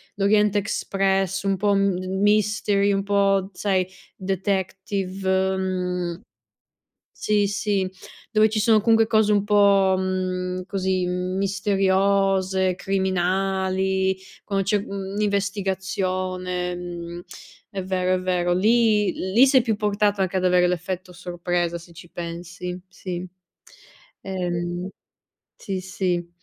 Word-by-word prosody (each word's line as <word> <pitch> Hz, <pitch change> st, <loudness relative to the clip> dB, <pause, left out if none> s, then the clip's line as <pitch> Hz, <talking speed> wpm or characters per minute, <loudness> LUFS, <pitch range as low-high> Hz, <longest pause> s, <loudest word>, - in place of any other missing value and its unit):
l'Orient 210 Hz, +1 st, +3 dB
Express, 195 Hz, -2 st, 0 dB
un 195 Hz, -1 st, +1 dB
po' 205 Hz, +1 st, +2 dB
m 195 Hz, -2 st, +1 dB, 0.2 s
mystery, 205 Hz, -1 st, +2 dB
un 195 Hz, 0 st, 0 dB
po' 195 Hz, -1 st, +2 dB
sai 185 Hz, -2 st, 0 dB, 0.3 s
detective. 190 Hz, 0 st, -1 dB
Mhmm 180 Hz, -2 st, -2 dB, 1.0 s
sì, 205 Hz, -1 st, +2 dB
sì, 200 Hz, -2 st, -1 dB, 0.4 s
dove 215 Hz, 0 st, +4 dB
ci 215 Hz, 0 st, -1 dB
sono 220 Hz, -1 st, +4 dB
comunque 225 Hz, 0 st, +4 dB
cose 215 Hz, -2 st, +3 dB
un 205 Hz, -1 st, +3 dB
po' 200 Hz, -2 st, +4 dB
mhmm, 185 Hz, -1 st, -2 dB
così, 190 Hz, -2 st, -1 dB
misteriose, 190 Hz, 0 st, +1 dB
criminali, 190 Hz, 0 st, 0 dB, 0.3 s
quando 195 Hz, -2 st, -1 dB
c'è 205 Hz, +2 st, +2 dB
mhmm, 195 Hz, 0 st, -5 dB
investigazione. 185 Hz, -3 st, -1 dB
Mhmm, 175 Hz, -1 st, -7 dB, 0.5 s
è 195 Hz, -3 st, -4 dB
vero, 185 Hz, 0 st, 0 dB
è 185 Hz, -, 0 dB
vero. 180 Hz, -1 st, 0 dB
Lì 215 Hz, +1 st, +3 dB, 0.2 s
lì 255 Hz, +5 st, +6 dB
sei 260 Hz, -2 st, +5 dB
più 225 Hz, -3 st, 0 dB
portato 205 Hz, -1 st, 0 dB
anche 190 Hz, 0 st, 0 dB
ad 185 Hz, -, 0 dB
avere 180 Hz, -1 st, +4 dB
l'effetto 180 Hz, +1 st, -3 dB
sorpresa 175 Hz, -1 st, -2 dB
se 170 Hz, 0 st, -11 dB
ci 170 Hz, +1 st, -13 dB
pensi, 175 Hz, +1 st, -6 dB
sì. 185 Hz, -1 st, -6 dB, 1.0 s
Ehm 175 Hz, -1 st, -3 dB, 0.7 s
sì, 190 Hz, -2 st, -4 dB
sì. 180 Hz, -2 st, -2 dB
190 Hz, 115 wpm, -23 LUFS, 180-200 Hz, 1.0 s, lì